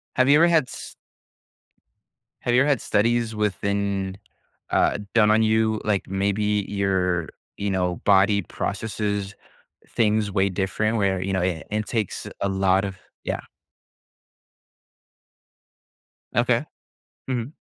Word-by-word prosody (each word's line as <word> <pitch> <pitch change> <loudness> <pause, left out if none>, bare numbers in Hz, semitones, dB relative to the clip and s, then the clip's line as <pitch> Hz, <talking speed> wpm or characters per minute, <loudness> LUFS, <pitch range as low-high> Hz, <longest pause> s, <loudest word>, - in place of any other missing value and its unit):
Have 130 +1 +3
you 145 - +7
ever 170 +2 +6
had 165 -3 +4
s - - -9 1.5
have 120 - 0
you 125 - +5
ever 145 - +2
had 140 -4 +2
studies 115 +1 +1
within 100 -1 -1 0.5
uh, - - +3 0.2
done 105 -2 +5
on 110 +1 +4
you, 110 0 +2
like, 105 -2 0
maybe 100 +1 0
your 95 -4 0 0.3
you 100 - -2
know 90 -2 -1
body 100 +1 +4
processes 100 0 -3 0.5
things 110 -2 +1
way 95 +1 +2
different 100 +4 -1
where, 95 -3 +1
you 95 +1 -2
know, 95 - +1
eh, 90 -3 -1
it 105 0 -1
takes 110 -5 -2
a 100 - +1
lot 95 0 +2
of 95 -1 -6 0.3
yeah. - - -2 2.9
Okay. - - +2 0.6
Mhm. 125 +1 -3
100 Hz, 125 wpm, -24 LUFS, 95-110 Hz, 2.9 s, you